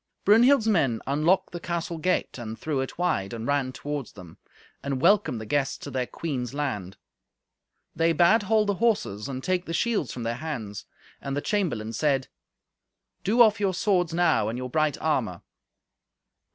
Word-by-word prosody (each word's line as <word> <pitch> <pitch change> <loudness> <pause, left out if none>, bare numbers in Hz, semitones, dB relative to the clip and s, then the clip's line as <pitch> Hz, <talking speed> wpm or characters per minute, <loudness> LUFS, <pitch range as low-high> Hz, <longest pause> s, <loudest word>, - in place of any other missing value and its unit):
Brunhild's 230 +3 +5
men 140 - +2
unlocked 155 +7 +2
the 175 - -5
castle 170 -1 -3
gate 180 -5 -1
and 110 -1 -6
threw 145 -4 -2
it 130 - -6
wide, 120 - 0
and 115 -1 -5
ran 140 -2 0
toward 145 -1 -5
them, 90 -6 -13 0.4
and 140 -2 -2
welcomed 170 - +3
the 110 - -7
guests 140 +4 0
to 145 - -8
their 125 -1 -2
queen's 130 -6 -4
land. 105 -11 -3 1.0
They 165 +1 +3
bade 175 +7 +4
hold 215 +1 +2
the 205 - +1
horses, 185 - 0
and 130 -1 -5
take 185 -1 0
the 165 - -3
shields 215 - 0
from 120 - -6
their 115 +1 -2
hands. 125 -10 -6 0.3
And 140 0 -3
the - - +2
chamberlain 145 - -1
said, 135 +2 0 0.9
"Do 235 +5 +5
off 215 -2 +3
your 195 -3 0
swords 180 -3 +1
now, 165 -11 +2
and 115 - -4
your 125 0 -5
bright 155 -1 +1
armour." 115 - -1
145 Hz, 170 wpm, -26 LUFS, 125-180 Hz, 1.0 s, Brunhild's